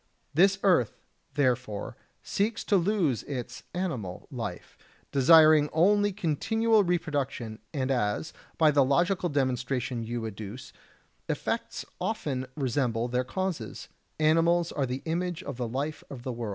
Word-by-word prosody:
This 190 +5 +5
earth, 175 - +3 0.4
therefore, 125 -7 0 0.3
seeks 210 +2 -1
to 205 - +2
lose 175 - +2
its 125 -3 -6
[animal] 130 - -3
life, - - -6 0.4
desiring 155 +1 +6
only 205 +5 +4
continual 215 +5 +2
reproduction, 145 - -2
and 135 -2 -1
as, 120 +4 -1 0.2
by 155 -2 +5
the 140 -1 +4
logical 175 +7 +2
demonstration 130 -3 -1
you 120 +1 -3
adduce, 110 +3 -7 0.6
effects - - -2
often 150 - -2
resemble 125 -4 0
their 125 +1 0
causes, 170 - -4 0.3
animals 165 +2 +3
are 135 -2 -1
the 130 +3 -4
image 175 +2 -2
of 120 - -6
the 125 -2 -2
life 140 +6 -3
of 125 -4 -8
the 130 - -3
world. 115 -2 -4
145 Hz, 130 wpm, -28 LUFS, 125-175 Hz, 0.6 s, desiring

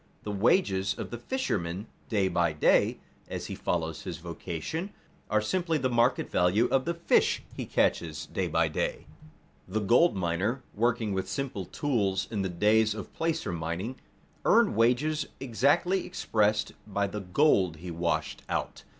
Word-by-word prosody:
The 105 - -4
wages 100 - +2
of - - -6
the 120 - -5
fisherman 100 - -2 0.2
day 100 -4 +2
by 85 -3 +1
day, 75 - +3 0.3
as - - -4
he - - -5
follows 80 -2 -2
his 85 - -5
vocation, 85 - -5 0.4
are 110 0 +2
simply 165 +6 0
the 130 -3 0
market 120 +2 +2
value 90 +6 +3
of 130 -1 +2
the 170 +1 -1
fish 170 - +2
he - - -5
catches 75 -2 0
day - - -2
by - - +2
day. - - -2 0.6
The 100 +4 -1
gold 120 - +4
miner, 95 +8 -1
working 115 -1 +1
with 95 0 -2
simple 125 -6 -3
tools 100 - 0
in 105 -3 -1
the 95 - -1
days 105 +4 +3
of 105 - -8
placer 165 - -1
mining, 85 +9 -4 0.4
earned - - +4
wages 125 +7 +2
exactly 140 +9 +2
expressed 105 - +1 0.2
by 100 -1 0
the 105 +1 -4
gold 95 - +3
he 85 +2 -7
washed 85 -2 -1
out. - - -3
105 Hz, 155 wpm, -29 LUFS, 90-130 Hz, 0.6 s, gold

